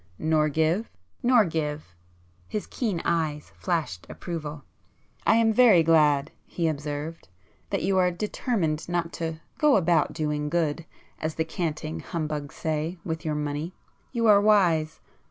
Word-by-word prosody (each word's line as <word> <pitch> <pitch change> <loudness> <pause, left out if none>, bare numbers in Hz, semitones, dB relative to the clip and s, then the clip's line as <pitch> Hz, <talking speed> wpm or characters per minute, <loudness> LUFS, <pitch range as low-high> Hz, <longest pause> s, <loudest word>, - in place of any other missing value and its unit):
"Nor 155 -1 +2
give?" 160 +8 +1 0.3
"Nor 240 -3 +5
give." 150 - -3 0.5
His 210 - -3
keen 210 -9 -2
eyes 155 -3 -1
flashed 160 - -2
approval. 150 -4 -6 0.6
"I - - +6
am 225 -1 +4
very 215 -8 +6
glad," 150 -3 +4 0.2
he 170 -2 -1
observed, 150 0 -4 0.4
"that 195 - -1
you 190 -1 +2
are 180 -1 +4
determined 175 -4 -2
not 175 -1 -1
to 160 -1 -3 0.2
'go 300 -2 +5
about 170 -5 +3
doing 150 -2 -2
good' 165 -1 0 0.3
as 155 0 -3
the 160 - 0
canting 160 -2 -3
humbugs 150 -4 -4
say, 160 +2 -2
with 160 -1 -3
your 155 -2 -1
money. 150 +4 -3 0.4
You 235 -2 0
are 205 -2 +7
wise. 175 -7 +3
160 Hz, 140 wpm, -26 LUFS, 150-180 Hz, 0.6 s, are